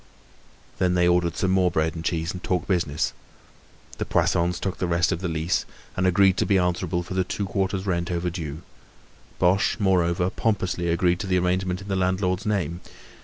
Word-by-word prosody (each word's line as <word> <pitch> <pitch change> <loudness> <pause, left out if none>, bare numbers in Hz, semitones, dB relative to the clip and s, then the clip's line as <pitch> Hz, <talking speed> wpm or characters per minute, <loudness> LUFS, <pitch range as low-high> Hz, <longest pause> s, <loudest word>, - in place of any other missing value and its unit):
Then 90 -1 +2
they 90 0 +3
ordered 90 -1 +2
some 95 - +1
more 95 -1 +3
bread 80 -1 0
and 80 - -6
cheese 85 0 -1
and 90 - -7
talked 90 -1 -1
business. 85 -6 0 0.9
The - - 0
Poissons 85 +1 +1
took 95 -1 -3
the 90 - 0
rest 85 +1 +2
of 85 -1 -2
the 95 - -1
lease 80 +1 0 0.3
and 95 0 +1
agreed 95 +1 +4
to - - +2
be 100 - +4
answerable 90 -1 0
for 90 - -7
the 95 0 +1
two 100 +3 -3
quarters' 95 0 -1
rent 85 -3 -1
overdue. 85 -3 -3 0.7
Boche, 90 +3 +2
moreover, 90 -2 +2
pompously 95 -5 -1
agreed 85 +1 +2
to 100 - -4
the 90 -1 +2
arrangement 90 +1 0
in 95 - -10
the 95 - -1
landlord's 95 +1 0
name. 90 -5 -1
90 Hz, 185 wpm, -24 LUFS, 85-95 Hz, 0.9 s, agreed